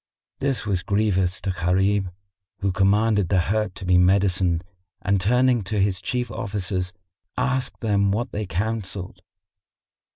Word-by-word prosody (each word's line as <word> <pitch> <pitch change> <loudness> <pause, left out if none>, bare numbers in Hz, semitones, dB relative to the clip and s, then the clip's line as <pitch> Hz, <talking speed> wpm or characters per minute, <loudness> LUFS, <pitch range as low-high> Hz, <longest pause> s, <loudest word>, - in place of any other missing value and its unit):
This 135 -4 -1
was 95 -4 0
grievous 95 -2 +1
to 95 - -1
Gharib 95 +2 +1 0.5
who 100 -1 +1
commanded 100 0 +2
the 95 - +3
hurt 100 +2 0
to 95 - -7
be 90 0 +4
medicined 90 -2 +2 0.4
and 100 0 +1
turning 125 +4 +3
to 105 +3 -1
his 95 -1 +1
Chief 125 -1 -2
Officers, 95 -3 -3 0.5
asked 130 0 -1
them 100 -3 +2
what 115 +4 -1
they 105 -1 -3
counselled. 100 -1 -3
100 Hz, 135 wpm, -23 LUFS, 95-110 Hz, 0.5 s, be